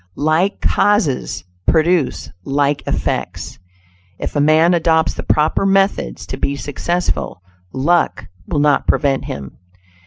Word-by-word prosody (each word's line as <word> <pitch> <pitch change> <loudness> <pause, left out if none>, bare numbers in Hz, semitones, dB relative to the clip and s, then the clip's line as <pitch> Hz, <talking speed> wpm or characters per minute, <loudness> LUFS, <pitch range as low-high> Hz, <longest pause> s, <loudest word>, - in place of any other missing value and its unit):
"Like 160 +7 +1
causes 205 - +1 0.2
produce 155 - +1
like 140 +3 0
effects." - - -3 0.6
If - - -5
a 145 - +2
man 160 +4 +4
adopts 160 -1 +2
the - - -6
proper 155 +5 +1
methods 195 - +1
to - - -6
be 140 - -1
successful, 145 - -3 0.3
"luck" 165 +7 +1 0.2
will - - -2
not 145 -1 +2
prevent 140 -3 +1
him. 70 -2 -7
155 Hz, 120 wpm, -18 LUFS, 140-175 Hz, 0.6 s, man